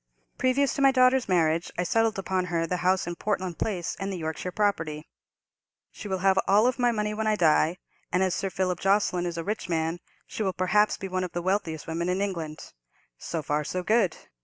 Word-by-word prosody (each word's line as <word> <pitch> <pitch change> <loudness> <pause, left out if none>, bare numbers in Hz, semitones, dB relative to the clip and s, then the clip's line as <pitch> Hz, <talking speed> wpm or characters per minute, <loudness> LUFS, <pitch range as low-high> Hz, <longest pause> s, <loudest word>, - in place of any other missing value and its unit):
"Previous 260 +2 +2
to 280 - -2
my 275 - +7
daughter's 255 -2 +3
marriage 165 -2 +2
I 180 - +1
settled 225 +4 +1
upon 190 -1 -1
her 170 -2 -1
the 180 +2 -2
house 185 +2 +1
in 175 0 -4
Portland 185 -5 -2
Place 180 -6 -2
and 195 0 -3
the 190 - -4
Yorkshire 160 +2 -4
property. 165 -7 -1 0.8
She - - -9
will 190 -1 -1
have 190 -1 +5
all 215 +6 +4
my 245 -1 +3
money 210 -2 -1
when 220 +1 -2
I 215 - +3
die; 165 -1 +3 0.3
and, 180 +1 +2
as 185 -2 +1
Sir 195 0 -2
Philip 185 -2 -1
Jocelyn 195 -3 +2
is 170 -1 -4
a 165 - -3
rich 210 0 -4
man, 165 +1 -1 0.3
she - - -6
will 190 -3 0
perhaps 190 +4 +2
be 195 - -5
one 185 0 -2
of 180 - -5
the 175 - -2
wealthiest 175 -5 -1
women 170 +2 -2
in 180 +1 0
England. 170 -6 -4 0.5
So 165 -2 -4
far 150 +1 0
so 180 +4 -3
good. 215 -3 +2
185 Hz, 210 wpm, -27 LUFS, 170-210 Hz, 0.8 s, my